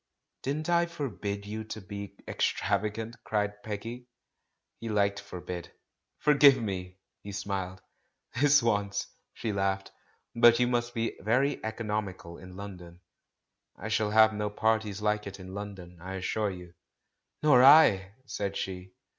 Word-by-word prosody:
"Didn't 150 +3 -2
I 170 0 +3
forbid 105 - -4
you 110 +2 -5
to 110 - -6
be 100 0 -8
extravagant?'* 105 +4 -1
cried 105 -1 -1
Peggy. 115 +4 -6 0.7
He 115 - -5
liked 100 -1 +1
"forbid." 90 -3 -7 0.5
"Forgive 140 -2 +6
me 100 -5 -2
I" 90 0 -14 0.3
he 100 - -8
smiled. 95 -2 -4 0.6
"This 145 -2 +6
once," 100 -3 0 0.3
she 110 - -3
laughed. 95 0 -1 0.4
"But 120 0 +7
you 125 - +4
must 120 -1 -1
be 115 0 -1
very 130 +6 +1
economical 105 -6 -4
in 90 0 -11
London." 90 -3 -9 0.8
"I 105 - -6
shall 110 -1 +1
have 110 +1 +6
no 105 0 -2
parties 105 -1 0
like 105 -1 0
it 100 0 -8
in 95 0 -9
London, 95 -4 -8
I 95 +2 -6
assure 105 +3 -1
you." 90 -2 -9 0.7
"Nor 135 -5 +6
I 105 -10 +7
!" 130 - -34
said 100 -5 -3
she. 95 -1 -5
105 Hz, 145 wpm, -29 LUFS, 95-115 Hz, 0.8 s, But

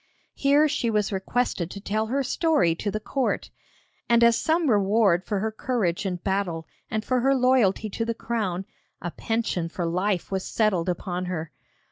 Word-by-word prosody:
Here 285 +2 +4
she 290 -5 0
was 210 -1 +1
requested 195 -2 -1
to 200 - -7
tell 215 +2 -1
her 275 +4 0
story 265 - +2
to 205 +5 -3
the 215 - -2
court, 265 +4 -2 0.6
and 235 0 +5
as 235 0 +6
some 320 +4 +1
reward 200 -4 +3
for 205 - -2
her 220 +1 -1
courage 215 -6 -1
in 180 - -1
battle 180 -3 -2 0.2
and 215 0 -2
for 255 -1 +1
her 270 +3 +3
loyalty 250 -5 +3
to 230 - -2
the 230 0 -2
crown, 200 -6 -2 0.3
a 175 - -4
pension 220 -7 -2
for 175 0 -3
life 180 +3 -1
was 190 -1 -1
settled 190 -6 +1
upon 180 0 -3
her. 165 -3 -4
210 Hz, 175 wpm, -25 LUFS, 180-235 Hz, 0.6 s, as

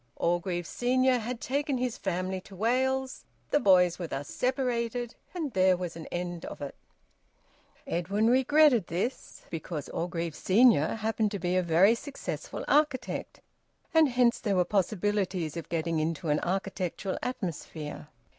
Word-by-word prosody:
Orgreave 175 0 -1
senior 255 +6 +2
had 235 +1 -4
taken 280 +1 -1
his 250 -2 -1
family 185 0 -2
to 195 - -14
Wales; 260 +5 0 0.3
the 290 - +4
boys 180 -6 +4
were 175 - -3
thus 140 -2 -5
separated, 245 -2 -1 0.2
and 310 -8 -3
there 185 -1 +4
was 175 -2 -5
an 165 - -8
end 175 -1 -4
of - - -8
it. 140 -1 -5 1.1
Edwin 200 +6 0
regretted 260 - +5
this, 190 +10 -4
because 160 -2 -5
Orgreave 170 -1 -3
senior 210 - +4
happened 220 -1 0
to 200 - -3
be 180 0 -1
a 185 - +4
very 175 +5 +5
successful 275 +4 -6
architect, 290 -4 0 0.5
and 320 -3 +5
hence 245 -1 +3
there 205 -4 0
were 180 -1 +3
possibilities 195 -4 0
of 170 - -6
getting 165 -1 -1
into 160 +1 -2
an 150 0 +3
architectural 190 0 -2
atmosphere. 160 - -5
195 Hz, 145 wpm, -29 LUFS, 175-245 Hz, 1.1 s, regretted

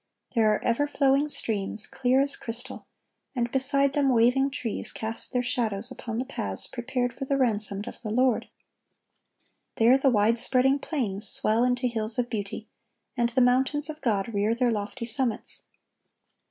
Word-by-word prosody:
There 220 -3 +4
are 210 - -1
ever 245 +5 +1
flowing 280 0 +2
streams, 215 -5 -3
clear 255 +1 +1
as 280 +1 0
crystal, 230 +1 -6 0.5
and 240 -1 -1
beside 275 +1 +2
them 280 -2 +2
waving 250 +3 +4
trees 245 -5 -2
cast 225 +1 -5
their 250 -1 0
shadows 235 -3 0
upon 230 -3 -5
the 255 - -1
paths 275 - -3
prepared 245 0 -2
for 270 - -5
the 275 +1 0
ransomed 210 -5 0
of - - -8
the 220 - -5
Lord. 250 +2 +1 1.3
There 240 +4 +5
the 270 - +4
wide 225 0 +3
spreading 265 +3 +3
plains 215 -10 -2
swell 220 +2 +1
into 250 0 +1
hills 220 -2 -1
of 245 -1 -1
beauty, 210 0 -4 0.5
and 240 -2 +1
the 250 +2 +1
mountains 265 +5 +2
of 310 +1 -13
God 220 -3 0
rear 210 +3 +1
their 245 0 +2
lofty 215 +3 -3
summits. 235 -1 -1
245 Hz, 165 wpm, -27 LUFS, 220-265 Hz, 1.3 s, There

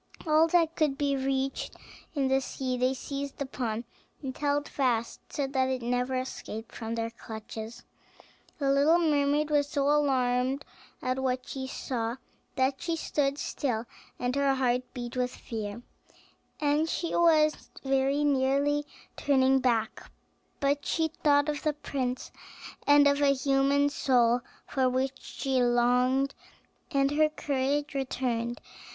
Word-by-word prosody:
All 315 +1 +5
that 330 -1 +2
could 300 -4 +1
be 285 -1 +1
reached 270 0 -2 0.4
in 275 -2 +1
the 265 0 +2
sea 260 -1 -3
they 255 +2 +1
seized 280 +2 -5
upon, 245 -5 -3 0.4
and 260 -1 -4
held 290 0 0
fast, 240 -4 0
so 285 - -1
that 265 -1 0
it 260 -2 -2
never 250 +2 0
escaped 230 -3 -5
from 225 0 -4
their 230 0 -2
clutches. 220 0 -8 0.7
The 275 -2 +1
little 285 +5 +5
mermaid 300 -2 +2
was 290 -1 +2
so 280 -2 0
alarmed 265 -2 +2 0.4
at 255 0 0
what 255 -1 -1
she 265 -1 -5
saw, 235 -3 -3 0.4
that 265 +1 +1
she 335 -1 -1
stood 285 -3 0
still, 245 -7 -2 0.3
and 250 +1 -1
her 280 -1 +2
heart 255 -1 0
beat 240 0 -5
with 250 0 -1
fear, 220 0 -6 0.8
and 300 +2 +2
she 335 - -2
was 310 -3 +3
very 270 +1 +2
nearly 285 +1 +2 0.3
turning 265 -1 +3
back; 240 -3 0 0.5
but 280 0 +1
she 320 -1 0
thought 290 -2 +2
of 295 -1 -2
the 305 - +1
prince, 260 -3 -3 0.6
and 290 0 +7
of 280 0 +4
the 280 -1 +4
human 275 +1 +2
soul 245 -4 +2 0.2
for 260 -1 +1
which 260 +1 -1
she 265 -2 -1
longed, 250 +3 +3 0.6
and 275 0 +2
her 305 +1 +3
courage 290 0 -1
returned. 245 -3 -2
270 Hz, 140 wpm, -29 LUFS, 250-285 Hz, 0.8 s, and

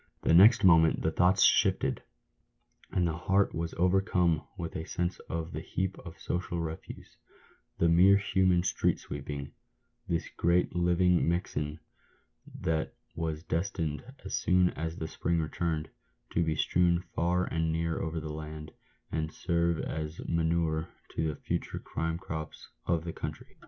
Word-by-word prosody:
The - - +3
next 105 +6 +7
moment 80 -3 +5
the 80 - +2
thoughts 90 +3 +4
shifted, - - +3 0.9
and 90 -2 +1
the 80 - -1
heart 95 +3 +1
was 85 0 -3
overcome 90 -2 +2 0.2
with 85 -3 -5
a 80 - -3
sense 90 +2 -2
of 80 0 -3
the - - -4
heap 95 +1 -2
of 85 -3 -11
social 85 -1 -3
refuse 80 -1 -7 0.3
— - - -34
the 85 - +3
mere 90 +4 +6
human 95 -3 +2
street - - +1
sweepings 70 0 -6 0.3
— - - -45
this 85 -1 -1
great 85 0 +1
living 90 0 +3
mixen, 80 -3 -2 0.8
that 80 -1 -1 0.2
was 80 -1 -3
destined, 80 -4 -2 0.2
as - - -5
soon 90 -1 +3
as 80 +1 -4
the 80 - -4
spring 85 +1 -1
returned, 80 0 -2 0.4
to 85 - +2
be 80 -1 0
strewn 85 +2 +2
far 90 +2 +1
and 80 0 -1
near 80 0 -1
over 80 0 -2
the 75 -1 -5
land, 75 0 -7 0.4
and 80 -1 -2
serve 85 0 0
as 80 +1 -4
manure 80 -1 0 0.2
to 80 - 0
the 75 - -2
future - - -3
crime 80 0 -3
crops 80 -3 -7 0.2
of 85 -2 +1
the 85 -1 -5
country. - - -7
85 Hz, 155 wpm, -30 LUFS, 80-90 Hz, 0.9 s, next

